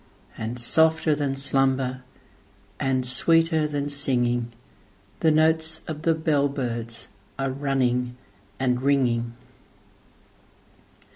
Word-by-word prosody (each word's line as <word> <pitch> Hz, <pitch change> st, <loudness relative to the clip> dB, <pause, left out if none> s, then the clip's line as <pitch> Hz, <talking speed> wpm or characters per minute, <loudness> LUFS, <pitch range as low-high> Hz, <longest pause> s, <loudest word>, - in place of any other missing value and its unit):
And, 115 Hz, +2 st, -5 dB
softer 160 Hz, +5 st, +3 dB
than 145 Hz, -2 st, -1 dB
slumber, 135 Hz, -1 st, +1 dB, 0.8 s
and 130 Hz, -1 st, 0 dB
sweeter 160 Hz, +4 st, +2 dB
than 145 Hz, -1 st, -3 dB
singing, 120 Hz, -4 st, +1 dB, 0.7 s
The 160 Hz, -, +3 dB
notes 160 Hz, +1 st, +2 dB
of 155 Hz, -1 st, -5 dB
the 165 Hz, 0 st, +2 dB
bell 150 Hz, -3 st, +1 dB
birds 120 Hz, -4 st, -4 dB, 0.3 s
are 135 Hz, -1 st, -1 dB
running 125 Hz, -3 st, -1 dB, 0.4 s
and 125 Hz, -1 st, 0 dB
ringing. 120 Hz, -4 st, +1 dB
135 Hz, 95 wpm, -24 LUFS, 125-155 Hz, 0.8 s, softer